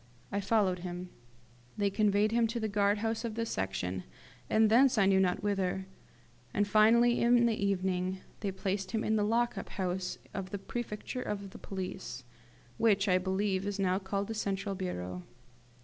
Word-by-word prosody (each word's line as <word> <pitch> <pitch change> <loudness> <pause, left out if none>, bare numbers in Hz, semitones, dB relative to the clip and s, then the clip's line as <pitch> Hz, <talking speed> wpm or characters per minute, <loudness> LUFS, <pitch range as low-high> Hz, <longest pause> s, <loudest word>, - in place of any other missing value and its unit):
I 200 - 0
followed 195 -3 +2
him. 180 0 -6 0.7
They 200 -1 +1
conveyed 210 0 +2
him 230 0 +3
to 235 +2 -3
the 220 - -1
guard 205 0 +2
house 225 +1 -1
of 230 -2 -3
the 230 0 -1
Section, 95 - -2 0.5
and 220 0 +5
thence 245 +3 +5
I 200 - +5
know 190 0 +4
not 185 0 +1
whither; 190 -2 0 0.7
and, 205 0 +2
finally, 230 +3 +5
in 240 0 +5
the 230 - +3
evening, 185 -1 0 0.2
they 200 -1 -2
placed 190 0 -3
him 220 - 0
in 220 - +1
the 215 - +2
lockup 235 +3 0
house 185 -1 -2 0.2
of 190 -1 -4
the 200 - -3
prefecture 240 +4 -5
of 200 -4 -4
police, 185 -9 -5 0.6
which, 205 -3 +3
I 185 -1 +4
believe, 190 +1 0
is 205 -1 -2
now 190 -1 +1
called 200 +1 -2
the 225 - -3
central 200 -2 -2
bureau. 90 - -4
200 Hz, 170 wpm, -31 LUFS, 185-220 Hz, 0.7 s, and